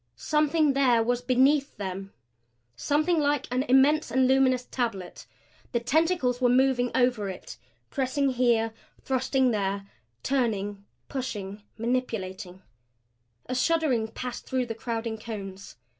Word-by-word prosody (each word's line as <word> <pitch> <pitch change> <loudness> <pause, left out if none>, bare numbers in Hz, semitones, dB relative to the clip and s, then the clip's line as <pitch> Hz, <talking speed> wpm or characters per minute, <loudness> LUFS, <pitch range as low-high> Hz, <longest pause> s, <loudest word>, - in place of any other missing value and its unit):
Something 300 -1 +2
there 250 -4 +3
was 245 +1 0
beneath 265 +3 +2
them 195 0 -5 0.6
something 310 - +1
like 290 -2 +1
an 250 +1 +1
immense 270 +4 +4
and 260 +2 +3
luminous 260 -1 +3
tablet. 225 -8 -4 0.5
The 235 - +2
tentacles 265 -1 +1
were 245 - +4
moving 250 -1 +3
over 245 -5 +2
it 185 - -8 0.3
pressing 270 +1 0
here, 235 -3 +2 0.3
thrusting 260 0 +1
there, 200 -2 -1 0.4
turning, 205 -6 -1 0.2
pushing, 210 -7 -5 0.2
manipulating 210 -6 -3 0.8
A - - -4
shuddering 255 -4 +1
passed 245 +2 -7
through 260 -2 0
the 230 - -4
crowding 225 -1 -4
cones. 195 - -8
250 Hz, 120 wpm, -27 LUFS, 220-270 Hz, 0.8 s, immense